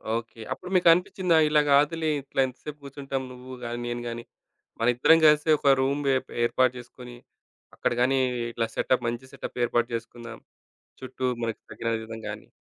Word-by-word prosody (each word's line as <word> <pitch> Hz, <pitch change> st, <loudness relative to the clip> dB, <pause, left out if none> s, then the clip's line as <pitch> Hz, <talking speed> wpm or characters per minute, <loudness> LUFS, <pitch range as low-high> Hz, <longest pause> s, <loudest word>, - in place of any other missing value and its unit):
Okay. 115 Hz, -1 st, -6 dB
అప్పుడు 180 Hz, -, -10 dB
మీకనిపించిందా? 180 Hz, 0 st, +4 dB
ఇలా 150 Hz, 0 st, +4 dB
కాదులే 155 Hz, +3 st, +3 dB
ఇట్లా 135 Hz, 0 st, -6 dB
ఎంత 130 Hz, -, -11 dB
సేపు 150 Hz, -1 st, -8 dB
కూర్చుంటాం 135 Hz, -1 st, -4 dB
నువ్వు 125 Hz, +1 st, -10 dB
గాని, 120 Hz, +1 st, -4 dB
నేను 120 Hz, 0 st, -3 dB
గాని, 115 Hz, 0 st, -5 dB, 0.6 s
మన 115 Hz, -, +1 dB
ఇద్దరం 160 Hz, +6 st, +5 dB
కలిసి 150 Hz, +1 st, +5 dB
ఒక 140 Hz, -1 st, +5 dB
రూమ్ 140 Hz, +2 st, 0 dB
వె 135 Hz, -, +4 dB, 0.3 s
ఏర్పాటు 130 Hz, +1 st, +2 dB
చేసుకొని, 125 Hz, 0 st, -12 dB, 0.6 s
అక్కడ -, -, -1 dB
గాని 135 Hz, +1 st, +3 dB, 0.3 s
ఇట్లా 115 Hz, -1 st, -1 dB
సెటప్ 125 Hz, -2 st, +1 dB
మంచి 125 Hz, +3 st, -7 dB
సెటప్ -, -, -7 dB
ఏర్పాటు 120 Hz, 0 st, +1 dB
చేసుకుందాం. 115 Hz, 0 st, -8 dB, 0.6 s
చుట్టూ 130 Hz, 0 st, -5 dB, 0.2 s
మనకు 115 Hz, -1 st, -3 dB
తగిన 115 Hz, -, -3 dB, 0.2 s
విధంగా 110 Hz, -1 st, -7 dB
అని. -, -, -19 dB
130 Hz, 160 wpm, -26 LUFS, 120-145 Hz, 0.6 s, ఇద్దరం